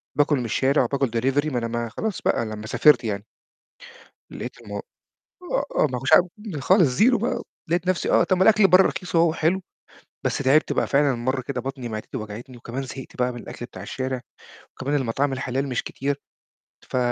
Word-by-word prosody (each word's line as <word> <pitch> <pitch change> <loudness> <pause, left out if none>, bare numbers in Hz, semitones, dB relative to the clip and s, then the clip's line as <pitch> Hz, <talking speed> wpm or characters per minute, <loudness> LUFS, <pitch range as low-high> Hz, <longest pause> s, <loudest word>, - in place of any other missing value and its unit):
باكل 145 0 +3
من 125 - -2
الشارع 135 +5 +2
وباكل 140 -1 0
delivery 135 +4 +1
ما 125 - -1
أنا 115 -1 -1
ما 120 0 -3
خلاص 210 - -3
بقى 115 - +1
لمّا 110 0 -6
سافرت 150 +4 +5
يعني. 105 -2 -3 1.1
لقيت - - -7
الم - - -11 0.5
آآ، 380 +8 -4
آه، - - +4
ما - - -1
كنتش - - -2
عارف 180 - +7 0.4
خالص 190 +5 +5
زيرو 225 - +4
بقى، 235 +4 -1 0.3
لقيت 175 +2 0
نفسي 185 -1 +1
آه، - - +5
طَب 185 0 +2
الأكل 215 -1 +6
برّه 185 +1 +7
رخيص 175 -2 -3
أهو 165 +1 +5
وحلو. 170 +4 0 0.6
بس - - 0
تعبت 140 +3 +3
بقى، - - +1
فعلًا 140 -1 +3
مرّة 130 +3 -1
كده 130 0 -4
بطني 130 -1 -5
معدتي 110 -1 -6
وجعتني 110 +4 -7
وكمان 120 +3 -5
زهقت 130 0 -9
بقى 125 0 0
من 120 - -7
الأكل 120 - -8
بتاع - - -10
الشارع، 130 -1 -3 0.5
وكمان 140 +3 -2
المطاعم 135 +3 0
الحلال 130 +1 -2
مش 125 - -1
كتير 140 +1 -3 0.7
ف - - -1
135 Hz, 190 wpm, -24 LUFS, 120-160 Hz, 1.1 s, عارف